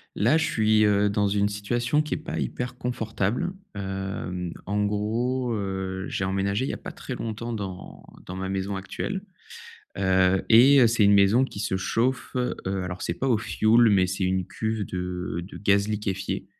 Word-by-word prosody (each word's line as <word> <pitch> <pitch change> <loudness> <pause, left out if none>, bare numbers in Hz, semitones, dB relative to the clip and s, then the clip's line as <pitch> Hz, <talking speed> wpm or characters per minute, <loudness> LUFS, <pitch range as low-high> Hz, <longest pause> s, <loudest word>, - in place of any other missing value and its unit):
Là 120 +10 +3
je 160 - +2
suis, 110 -1 +3
heu, 105 0 +3
dans 100 0 +1
une 100 0 +2
situation 120 +8 0
qui 150 - -3
est - - -1
pas 155 +2 -5
hyper 125 0 -3
confortable, 115 - -2 0.2
hem, 95 -3 -4
en 105 +2 0
gros, 120 +5 -1
heu, 95 -2 -3
j'ai 95 - -2
emménagé 100 +4 0
il - - -2
y - - -2
a - - -6
pas - - -8
très - - -7
longtemps 115 +1 -4
dans 95 -4 -6 0.2
dans 90 - -6
ma 95 0 -3
maison 95 +1 -2
actuelle, 95 - -4 0.8
heu 95 0 +3
et 130 +5 +7
heu, 120 - +7
c'est 115 -1 +3
une 100 - +6
maison 100 +6 +5
qui 130 - -8
se 100 -2 -1
chauffe, 120 +7 -1
heu, 125 0 0 0.3
alors 90 0 -5
c'est 85 - -2
pas 135 - 0
au 120 - +4
fioul, 115 +2 +4
mais 95 -2 +4
c'est 95 +1 -2
une 95 -1 0
cuve 110 -1 -2
de 90 -1 -4
de 95 - -10
gaz 100 0 +2
liquéfié, 100 -3 -3
100 Hz, 190 wpm, -25 LUFS, 95-115 Hz, 0.8 s, et